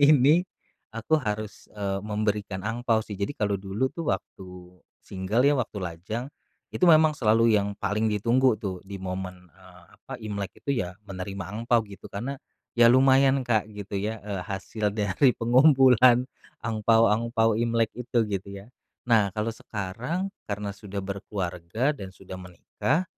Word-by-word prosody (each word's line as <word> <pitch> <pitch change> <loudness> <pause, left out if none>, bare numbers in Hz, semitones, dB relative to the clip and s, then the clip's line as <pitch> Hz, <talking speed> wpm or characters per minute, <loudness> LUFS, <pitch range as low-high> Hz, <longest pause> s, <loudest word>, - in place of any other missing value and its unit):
ini, 150 +4 +5 0.5
aku 150 +7 +1
harus, 105 -2 -5
eee, 100 -1 -2
memberikan 105 -2 -2
angpao 115 0 0
sih. 105 - -9
Jadi 145 +9 -2
kalau 100 -2 -1
dulu 100 +7 -2
tuh 165 -2 -4
waktu 90 -2 -6 0.2
single 100 +7 0
ya, 145 - +5
waktu 110 - -5
lajang. 95 +6 -4 0.5
Itu 180 - +2
memang 155 -1 +6
selalu 115 -4 +3
yang 100 -1 +1
paling 110 +2 0
ditunggu 115 +3 +2
tuh 95 -4 -5
di 100 0 -6
momen, 90 -1 -6
eee, - - -18 0.2
apa, - - -11
Imlek 100 -2 -5
itu 140 - 0
ya, 90 +1 -5
menerima 95 -1 -6 0.2
angpao 115 -1 +2
gitu. 100 -1 -12
Karena, 130 +7 -5 0.3
ya 120 -1 +6
lumayan, 135 +1 +5
Kak, 110 -3 +1
gitu 100 -1 -5
ya, 105 +1 -4
eee, 100 -3 -4
hasil 100 +2 -3
dari 105 +5 +2
pengumpulan 125 -1 +5 0.4
angpao-angpao 115 0 +2
Imlek 115 -1 +1
itu, 120 -1 0
gitu 100 -2 -4
ya. 100 +5 -10 0.3
Nah, 115 -5 +4
kalau 110 +1 -1
sekarang, 120 - -4 0.2
karena 100 0 -3
sudah 100 -1 -7
berkeluarga, 100 - -2
dan 100 -9 -8
sudah 95 0 -10
menikah. 110 - -2
105 Hz, 150 wpm, -26 LUFS, 100-120 Hz, 0.5 s, memang